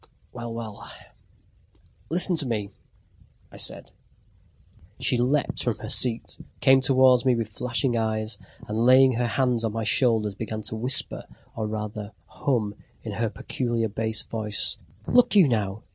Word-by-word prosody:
Well, 120 -1 -6
well! 115 -2 -7 1.3
"Listen 180 +2 +4
to 145 -4 0
me," 105 -4 -3 0.8
I - - -12
said. - - -3 1.1
She - - +2
leaped 135 +4 +1
from - - -1
her - - -8
seat, 120 -2 +1 0.2
came 135 0 +5
towards 130 -2 +4
me 130 -2 +3
with 115 -2 -3
flashing 120 +3 -1
eyes, 110 -1 -2 0.3
and 105 +1 -3
laying 130 +2 +6
her 120 0 -1
hands 125 -1 0
on 110 -2 -1
my 115 0 -2
shoulders, 110 -1 +2
began 110 +1 -5
to 110 - -4
whisper, 125 +4 0 0.3
or 110 -1 -3
rather 105 -1 -5
to 110 - -18
hum 115 -7 -2 0.3
in 110 - -5
her 110 +2 -1
peculiar 115 0 -2
bass 110 +1 -1
voice: 105 -2 -1 0.3
"Look 245 -3 +3
you, 190 -7 +7
now! 105 -4 -2
115 Hz, 150 wpm, -25 LUFS, 110-125 Hz, 1.3 s, you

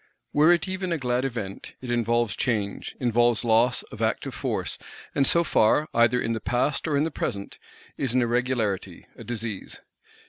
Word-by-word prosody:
Were 155 +3 +6
it 175 +1 +2
even 185 -1 -3
a 165 - +1
glad 125 -1 0
Event, 115 -7 -5
it 125 -2 -5
involves 120 -2 +1
change, 105 -6 -2
involves 120 -1 +2
loss 115 +2 +3
(of - - -8
active - - -1
Force); - - -3 0.3
and 135 -1 +3
so 170 - +4
far, 150 +2 +3
either 120 +1 +4
in 115 - -1
the 110 - -2
past 130 +8 0
or 145 -2 +1
in 145 - +3
the 160 - -1
present, 100 -8 -4 0.4
is 130 -3 -1
an 130 - +4
irregularity, 115 -7 -1
a - - -10
disease. 110 -3 -5
120 Hz, 175 wpm, -26 LUFS, 115-135 Hz, 0.4 s, Were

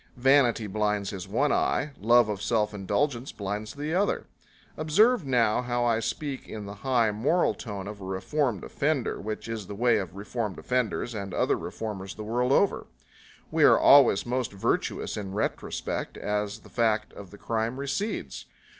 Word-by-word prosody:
Vanity 125 -3 +4
blinds 105 0 -1
his 95 -2 -6
one 135 +9 +1
eye, 150 - +1
love 120 +2 +5
of 105 -2 -3
self 110 -1 +1
indulgence 110 +7 -1
blinds 105 +3 -5
the 150 +3 -3
other. 200 +3 +1 0.5
Observe 185 - +3
now 120 -3 +3
how 120 -1 -1
I 115 -2 +2
speak 135 +3 -4
in 105 -2 -6
the 100 - -7
high 120 -4 +2
moral 140 +12 +2
tone 100 -5 -6
of 105 -1 -8
a - - -7
reformed 105 - -1
offender, 145 -3 -1
which 110 +2 -5
is 110 -4 -5
the 100 - -6
way 120 +1 +3
of 95 -2 -6
reformed 105 0 -4
offenders 125 -1 -1
and 100 -3 -5
other - - +2
reformers 100 -4 -6
the 110 - -7
world 120 +4 0
over. 200 +7 +2 0.6
We - - +2
are - - +7
always 135 -8 +6
most 125 -2 -2
virtuous 100 - -1
in 100 -2 -5
retrospect, 105 - -3
as 105 0 -2
the - - -16
fact 110 -2 0
of 100 -2 -10
the 100 - -13
crime 115 +4 -2
recedes. 145 +10 -3
115 Hz, 170 wpm, -27 LUFS, 105-130 Hz, 0.6 s, are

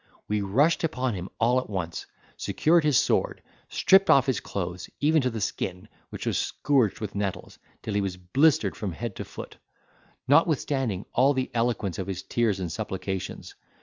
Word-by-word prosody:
We 105 0 0
rushed 135 +15 +2
upon 130 -6 -1
him 90 -1 -5
all 120 +3 +3
at 130 - -7
once, 90 -4 -4 0.3
secured 165 +1 +2
his 150 -4 +3
sword, - - +1 0.3
stripped 195 +1 +4
off 135 -1 +6
his 130 -5 0
clothes 90 -2 -5
even 155 +1 +3
to 130 - +1
the 115 -2 -5
skin, 95 -1 -3 0.2
which - - -7
was - - 0
scourged 130 -8 +1
with 105 -2 -5
nettles 100 -2 -4 0.2
till 110 - -3
he 100 - +1
was 95 -2 -3
blistered 105 - +2
from 100 -5 -4
head 115 +2 -5
to - - -4
foot, - - -10 0.7
notwithstanding 135 - +2
all 135 +3 +4
the 130 0 -2
eloquence 115 -7 -1
of 95 - -3
his 95 -2 -4
tears 110 -5 0
and 90 -3 -3
supplications. 95 +2 -5
110 Hz, 175 wpm, -26 LUFS, 95-135 Hz, 0.7 s, off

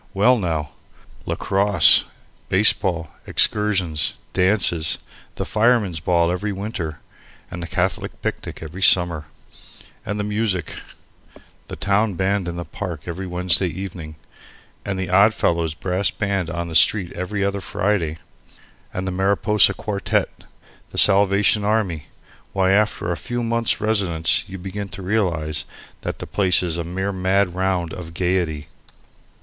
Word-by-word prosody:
well, 120 +6 +4
now! 80 - -3 0.6
lacrosse, 100 -3 +5 0.4
baseball, 95 -5 +2 0.2
excursions, 95 -7 +1 0.2
dances, 90 -4 +3 0.4
the - - -4
Fireman's 105 -6 +1
Ball 85 +1 +1
every 100 +4 -3
winter 95 -6 -5 0.5
and 90 - -6
the 85 - -5
Catholic 90 -1 -2
picnic - - -5
every 85 +5 -9
summer; 85 -5 +3 0.8
and 105 - -4
music 105 -4 -1 0.9
the - - -7
town 100 0 0
band 95 +1 -1
in 85 0 -5
the 85 - -5
park 85 -7 -7
every 90 +3 -5
Wednesday 90 +1 +1
evening, 85 -3 -7 0.7
and 100 -2 -4
the 95 -1 -3
Oddfellows' 85 -5 +2
brass 95 +3 0
band 100 -4 -2
on 85 -1 -4
the 85 - -7
street 90 +3 +4
every 100 +3 -3
other 100 0 -2
Friday; 90 -6 -1 0.8
the 95 +1 -3
Mariposa 100 +3 +2
Quartette, 100 -2 -3 0.4
the - - -9
Salvation 100 +1 +5
Army 100 -7 -1 0.5
why, 95 -1 +2
after 105 -3 +1
a - - -1
few 120 +11 -4
months' 115 0 +1
residence 95 -7 +1
you 95 - -7
begin 100 +2 -6
to 95 0 -9
realize 85 -7 -1 0.4
that - - -5
the - - -7
place 95 -3 +3
is 85 -2 -2
a - - -2
mere 95 +4 -3
mad 95 0 0
round 90 -3 -1
of 80 -2 -9
gaiety. 85 -5 -1
95 Hz, 135 wpm, -21 LUFS, 85-100 Hz, 0.9 s, lacrosse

